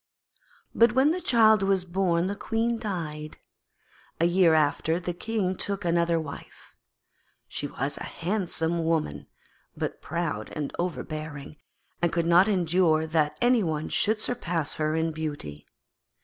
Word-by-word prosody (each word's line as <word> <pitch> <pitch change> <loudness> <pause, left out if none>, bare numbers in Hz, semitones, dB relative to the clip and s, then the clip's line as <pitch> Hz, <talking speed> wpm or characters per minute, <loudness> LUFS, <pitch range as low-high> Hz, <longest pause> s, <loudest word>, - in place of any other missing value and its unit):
But 230 +1 +5
when 265 +4 +4
the 365 +2 -2
child 220 - +5
was 195 -2 +1
born 175 -1 +1
the 200 +2 -2
Queen 225 +2 -1
died. 155 -8 -5 0.8
A 165 - +3
year 175 -2 +4
after 155 +2 +1
the 175 0 -4
King 190 0 -2
took 200 +1 -3
another 170 -1 +2
wife. 155 -3 -10 0.7
She 145 - -4
was 140 +1 -2
a - - -6
handsome 170 -3 -1
woman, 155 - -1 0.5
but - - -4
proud 155 -10 -3
and 150 -2 -4
overbearing, 155 -4 -5 0.4
and 175 -1 +2
could 170 -1 0
not 175 +3 +5
endure 175 -4 +2
that 155 -2 0
any 245 -1 +4
one 155 -4 -2
should 215 +1 +1
surpass 175 -10 -1
her 155 +1 +1
in 160 0 0
beauty. 145 - -6
170 Hz, 140 wpm, -27 LUFS, 155-195 Hz, 0.8 s, But